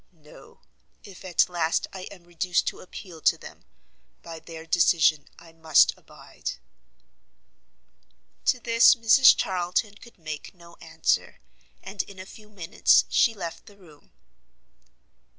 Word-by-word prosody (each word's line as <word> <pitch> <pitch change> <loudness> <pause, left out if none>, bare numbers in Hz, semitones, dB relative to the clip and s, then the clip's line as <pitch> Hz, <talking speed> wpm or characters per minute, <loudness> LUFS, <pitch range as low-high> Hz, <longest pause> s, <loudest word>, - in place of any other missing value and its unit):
No; 150 - -18 0.4
if 195 -2 -14
at 185 -2 +1
last 170 -2 -1
I 185 -1 -8
am 185 -4 -15
reduced 175 +1 -2
to - - -13
appeal 180 -3 -12
to - - +2
them, - - -14 0.6
by 165 -1 -9
their 160 0 -11
decision 160 -3 +2
I 165 0 -16
must 160 -1 +3
abide." - - -9 1.9
To 255 - +2
this 230 0 +5
Mrs 235 +3 +6
Charlton 185 +2 -2
could 235 +3 -17
make 155 +2 -8
no 170 -1 -17
answer, 160 0 -2 0.4
and 195 +1 -4
in 200 - -13
a 185 - -9
few 210 +2 -16
minutes 185 -6 +2
she 230 -3 +2
left 170 -4 -8
the 205 -2 -17
room. 155 -7 -20
175 Hz, 135 wpm, -25 LUFS, 165-200 Hz, 1.9 s, Mrs